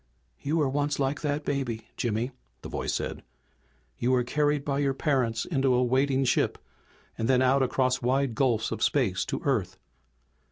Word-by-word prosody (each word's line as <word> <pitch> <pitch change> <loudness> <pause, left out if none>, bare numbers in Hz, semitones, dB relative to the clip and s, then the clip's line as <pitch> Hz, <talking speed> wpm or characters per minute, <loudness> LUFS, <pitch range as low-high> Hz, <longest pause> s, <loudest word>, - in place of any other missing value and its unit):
"You 150 +4 -1
were 150 -3 +2
once 145 +1 0
like 140 +1 -1
that 150 0 -1
baby, 120 -6 -2
Jimmy!" 120 +2 -1 0.3
the - - -6
voice - - -2
said. - - -3 0.8
"You 120 - +1
were 125 -1 +3
carried 145 +3 0
by 140 -1 0
your 140 -2 +1
parents 125 -7 0
into 135 -5 +1
a 125 - +3
waiting 135 +2 +2
ship, - - +1 0.6
and 115 - 0
then 130 0 +4
out 135 +2 +4
across 130 0 +1
wide 130 +1 +1
gulfs 120 -4 +1
of 110 -1 -4
space 100 -11 +2
to 135 0 -3
Earth. 100 -9 0
130 Hz, 170 wpm, -27 LUFS, 120-140 Hz, 0.8 s, then